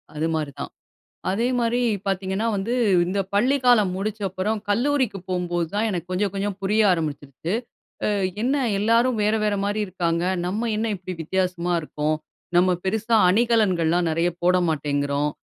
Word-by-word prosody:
அது 155 +2 0
மாரி 150 -2 -2
தான். - - -5 0.6
அதே 220 +5 0
மாரி 240 +1 +1 0.3
பாத்தீங்கன்னா 195 +2 -1
வந்து, 205 +5 -1 0.3
இந்த 195 +3 -1
பள்ளிக்காலம் 245 -4 +3
முடிச்ச 215 +2 -3
அப்புறம் 190 +4 -2
கல்லூரிக்கு 245 0 +1
போம்போது 175 -2 -1
தான், 210 +2 +1
எனக்கு 175 -3 -3
கொஞ்சம் 195 +1 0
கொஞ்சம் 200 0 -2
புரிய 210 +3 +2
ஆரம்பிச்சுருச்சு. 155 0 -3 0.5
அ - - +2 0.3
என்ன 260 +4 +1 0.2
எல்லாரும் 230 +3 +2
வேற 210 +1 +2
வேற 210 -1 +1
மாரி 205 +1 -1
இருக்காங்க, 170 -2 -1 0.2
நம்ம 215 +6 -1
என்ன 225 +1 0
இப்டி 185 0 -7
வித்தியாசமா 180 0 -1
இருக்கோம். 155 0 -2 0.4
நம்ம 180 +1 +5
பெருசா 220 +4 +1
அணிகலன்கள்லாம் 185 -6 +2
நெறைய 165 +2 +1
போட 180 +1 +4
மாட்டேங்கிறோம். 145 -1 0
190 Hz, 145 wpm, -23 LUFS, 170-220 Hz, 0.6 s, நம்ம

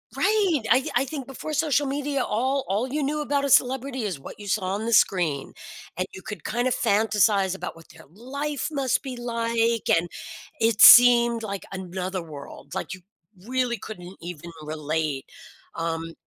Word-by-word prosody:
Right? 395 - +2
I 260 +2 +4
I 255 - +3
think 270 -1 -6
before 270 +3 -7
social 295 -2 +1
media, 280 0 -1
all 260 +5 0
all 210 +7 0
you 290 +2 -2
knew 300 +2 -1
about 285 -1 0
a 280 - 0
celebrity 260 -1 +2
is 190 -8 -3
what 135 - -11
you 205 - -9
saw 200 0 0
on 215 +2 -4
the 235 - -1
screen, 160 -11 +2 0.4
and 185 - 0
you 190 - -9
could 205 -6 -8
kind 240 +3 0
of - - 0
fantasize 205 -2 +2
about 190 - -6
what 165 -1 -17
their - - -16
life 280 - -4
must 275 -3 0
be 255 -2 -6
like, 230 -1 -1
and 170 +1 +3 0.5
it 225 -1 +2
seemed 235 -1 +8
like 200 -2 -5
another 185 0 -4
world. 145 -2 -11
Like, - - -4
you 185 - -10 0.4
really 250 -1 -1
couldn't 185 -4 -9
even 170 -1 -8
relate. 155 -2 -3 0.5
Um, 165 0 -4
230 Hz, 175 wpm, -25 LUFS, 185-265 Hz, 0.5 s, seemed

